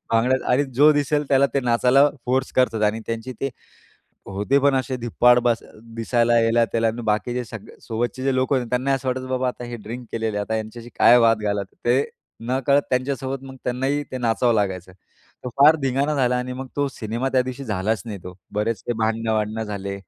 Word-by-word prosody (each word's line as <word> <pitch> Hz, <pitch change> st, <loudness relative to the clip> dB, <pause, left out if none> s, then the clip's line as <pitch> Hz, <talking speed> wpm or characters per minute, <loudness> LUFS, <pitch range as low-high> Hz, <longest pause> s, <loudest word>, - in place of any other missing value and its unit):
भांगडा 125 Hz, +3 st, +3 dB, 0.2 s
आणि 145 Hz, +3 st, +3 dB
जो 150 Hz, +4 st, +6 dB
दिसेल 145 Hz, 0 st, 0 dB
त्याला 140 Hz, 0 st, +4 dB
ते 140 Hz, -, +2 dB
नाचायला 125 Hz, +3 st, +4 dB, 0.2 s
फोर्स 130 Hz, +1 st, 0 dB
करत 125 Hz, -3 st, +3 dB
होते 110 Hz, -1 st, +1 dB
आणि 110 Hz, +2 st, -1 dB
त्यांची 115 Hz, +3 st, -4 dB
ते 135 Hz, -, -1 dB, 0.8 s
होते 105 Hz, +8 st, +1 dB
पण 140 Hz, 0 st, +3 dB
असे 130 Hz, 0 st, -1 dB
धिप्पाड, 120 Hz, +1 st, +3 dB
बस 120 Hz, -1 st, +1 dB, 0.3 s
दिसायला 120 Hz, +1 st, +2 dB
ह्याला 115 Hz, +1 st, +3 dB
त्याला. 115 Hz, 0 st, +1 dB
आणि 115 Hz, +2 st, -4 dB
बाकीचे 120 Hz, +3 st, -1 dB
सगळे 110 Hz, -2 st, -11 dB
सोबतचे 120 Hz, +3 st, -3 dB
जे 135 Hz, -1 st, +1 dB
लोक 130 Hz, +2 st, +1 dB
होते, 130 Hz, -, +1 dB
त्यांना 130 Hz, +2 st, +1 dB
असं 135 Hz, 0 st, -3 dB
वाटायचं 130 Hz, 0 st, -2 dB
बाबा 130 Hz, 0 st, 0 dB
आता 125 Hz, -, -5 dB
हे 120 Hz, 0 st, -6 dB
ड्रिंक 115 Hz, +3 st, -8 dB
केलेलं 110 Hz, -2 st, -2 dB
आहे. -, -, -1 dB
आता 110 Hz, -, -2 dB
ह्यांच्याशी 110 Hz, +2 st, -5 dB
काय 120 Hz, +1 st, +7 dB
वाद 115 Hz, -2 st, +3 dB
घालावा? 100 Hz, -1 st, -1 dB, 0.2 s
ते 125 Hz, +4 st, +4 dB, 0.5 s
नकळत 140 Hz, +2 st, +2 dB
त्यांच्यासोबत 135 Hz, +1 st, -2 dB
मग 130 Hz, 0 st, -10 dB
त्यांनाही 135 Hz, +4 st, -1 dB
ते 130 Hz, -, -3 dB
नाचावं 115 Hz, 0 st, +1 dB
लागायचं. 95 Hz, -3 st, -2 dB, 0.5 s
तो -, -, -2 dB
फार 150 Hz, +3 st, +7 dB
धिंगाणा 135 Hz, +3 st, 0 dB
झाला 125 Hz, -3 st, +2 dB
आणि 125 Hz, +1 st, -3 dB
मग 130 Hz, +1 st, -6 dB
तो 145 Hz, -, +1 dB
सिनेमा 120 Hz, +1 st, -3 dB
त्या 130 Hz, -, +4 dB
दिवशी 130 Hz, +2 st, -6 dB
झालाच 105 Hz, -1 st, -1 dB
नाही 105 Hz, -3 st, -5 dB
तो. 90 Hz, 0 st, -8 dB, 0.2 s
बरेच 105 Hz, 0 st, -1 dB
ते -, -, 0 dB
भांडणं-वांडणं 110 Hz, -1 st, -1 dB
झाले, 100 Hz, -2 st, -5 dB
120 Hz, 200 wpm, -22 LUFS, 110-130 Hz, 0.8 s, काय